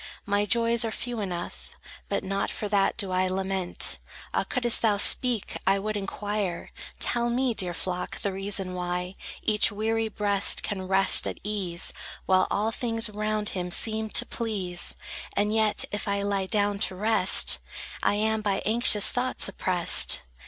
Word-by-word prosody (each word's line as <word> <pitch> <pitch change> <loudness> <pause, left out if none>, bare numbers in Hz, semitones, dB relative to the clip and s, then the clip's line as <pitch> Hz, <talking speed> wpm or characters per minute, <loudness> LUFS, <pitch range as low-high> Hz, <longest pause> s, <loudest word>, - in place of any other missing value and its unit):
My 205 0 0
joys 235 +2 +2
are 225 - -1
few 240 +1 -4
enough; 180 -4 -6 0.3
But 200 - -2
not 195 +1 -2
for 210 - -4
that 200 -1 +1
do 200 -4 0
I 185 0 +1
lament. 190 -1 +1 0.3
Ah, - - +1
couldst 240 -3 +3
thou 215 -3 +2
speak, 235 +1 +3
I 195 +1 +4
would 215 +2 -3
inquire: 205 -2 -4 0.3
Tell 240 0 0
me, 250 +1 0
dear 180 -5 -1
flock, 180 0 -4
the 200 - -3
reason 195 -1 -2
why 180 +1 -4 0.3
Each 215 0 +3
weary 225 +2 -1
breast 205 -2 +2
can 190 -3 -4
rest 195 0 +4
at - - -6
ease, 190 -5 -3 0.3
While 185 0 +3
all 215 +2 -1
things 225 -2 -1
round 215 0 -2
him 180 -1 -4
seem 220 +4 +1
to 240 - +1
please; 195 -8 -3 0.4
And 210 +1 +1
yet, 220 -1 +2
if 205 - -4
I 200 0 -1
lie 200 -1 -1
down 205 -1 0
to 190 - 0
rest, 210 -1 +3 0.4
I - - +1
am 220 +1 0
by 205 -2 -1
anxious 220 -2 +5
thoughts 255 +1 +1
oppressed? 185 -3 +2
205 Hz, 160 wpm, -26 LUFS, 190-220 Hz, 0.4 s, anxious